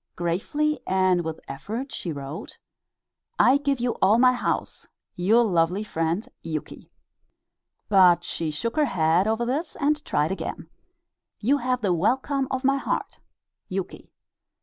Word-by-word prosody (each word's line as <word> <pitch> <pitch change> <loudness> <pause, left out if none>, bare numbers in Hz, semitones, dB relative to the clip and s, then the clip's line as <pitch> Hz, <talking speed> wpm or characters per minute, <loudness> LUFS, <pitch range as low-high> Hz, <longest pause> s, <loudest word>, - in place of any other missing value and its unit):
Gravely 270 - -1
and 185 -2 +2
with 160 -1 -5
effort 220 - -5
she 175 - -4
wrote: 140 +1 -7 0.8
"I 260 +3 +5
give 280 -2 -1
you 245 0 0
all 205 +4 +5
my 255 +1 +5
house. 245 - -3 0.3
Your 215 +7 +4
lovely 180 -1 +1
friend, 165 +1 -2
Yuki." 155 -2 -6 1.0
But 180 -4 +5
she 165 -2 -3
shook 230 +10 -3
her 305 - +4
head 175 - +2
over 225 +2 0
this 295 +7 -2
and 295 +1 0
tried 150 +3 0
again: 190 - -5 0.7
"You 265 +7 +2
have 250 0 -1
the 195 -4 +2
welcome 260 - 0
of 260 0 -2
my 275 +1 +3
heart. - - -3 0.5
Yuki." 190 0 -6
210 Hz, 140 wpm, -25 LUFS, 175-260 Hz, 1.0 s, I